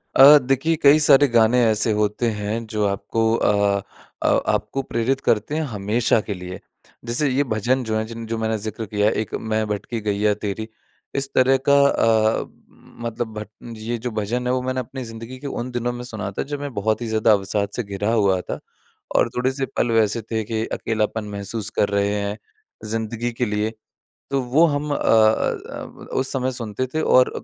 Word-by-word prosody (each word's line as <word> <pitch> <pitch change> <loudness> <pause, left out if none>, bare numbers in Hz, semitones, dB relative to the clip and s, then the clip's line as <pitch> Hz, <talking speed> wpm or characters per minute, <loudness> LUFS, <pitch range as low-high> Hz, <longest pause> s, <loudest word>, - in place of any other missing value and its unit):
अ, 140 +3 +10
देखिए 135 +4 +1
कई 145 +2 +7
सारे 145 -1 +6
गाने 120 0 +4
ऐसे 110 0 +3
होते 105 +3 0
हैं 105 +2 -3
जो 105 -1 0
आपको 100 +3 -2
अ 100 -2 +2 0.4
अ, - - +2 0.2
आपको 135 - 0
प्रेरित 130 +2 -1
करते 115 +7 0
हैं 160 - 0
हमेशा 110 +2 +1
के 105 - -1
लिए। 90 0 -8 0.5
जैसे 120 +6 +1
ये 135 +2 +2
भजन 125 +5 +1
जो 110 -2 -2
है 110 - 0
जिन 115 0 -7
जो 115 0 -2
मैंने 110 0 -1
ज़िक्र 110 +1 -5
किया 105 0 +1
है - - +2
एक 110 - -7
मैं 110 0 -1
भटकी 105 +3 -3
गैया 105 0 +1
तेरी 105 +2 -3 0.5
इस 135 0 -1
तरह 130 +1 +5
का 140 0 +6
अ, 110 -4 +3
उम, - - -17
मतलब 115 -1 -4
भट 105 - -8 0.3
ये 115 +2 -3
जो 125 - -1
भजन 120 +4 -2
है 125 - +1
वो 130 - 0
मैंने 130 0 -2
अपनी 130 +2 -6
ज़िंदगी 115 +2 -8
के 145 - -6
उन 125 -2 -4
दिनों 120 0 -2
में 120 0 -6
सुना 110 -5 -5
था - - 0
जब 145 - -2
मैं 145 -2 -5
बहुत 110 +2 0
ही 120 - -3
ज़्यादा 110 0 +3
अवसाद 100 0 +1
से 125 - -2
घिरा 100 +1 -2
हुआ 100 -4 +3
था - - -6 0.6
और - - +3
थोड़े-से 130 +2 0
पल 120 - +1
वैसे 110 0 +2
थे 110 -1 0
कि 110 +1 -2
अकेलापन 110 -1 -1
महसूस 100 +1 -4
कर 100 - +3
रहे 100 0 +1
हैं 100 +1 -3 0.5
ज़िंदगी 115 +2 -2
के 120 +2 -1
लिए। 105 +1 -1 0.6
तो 140 -1 +1
वो 130 +7 +3
हम 150 -1 -2
अ - - 0
अ - - -7 0.7
अ, - - -9
उस 130 0 0
समय 130 -1 -1
सुनते 120 0 -3
थे 155 - +1
और 130 -4 +4
115 Hz, 200 wpm, -22 LUFS, 105-125 Hz, 0.7 s, अ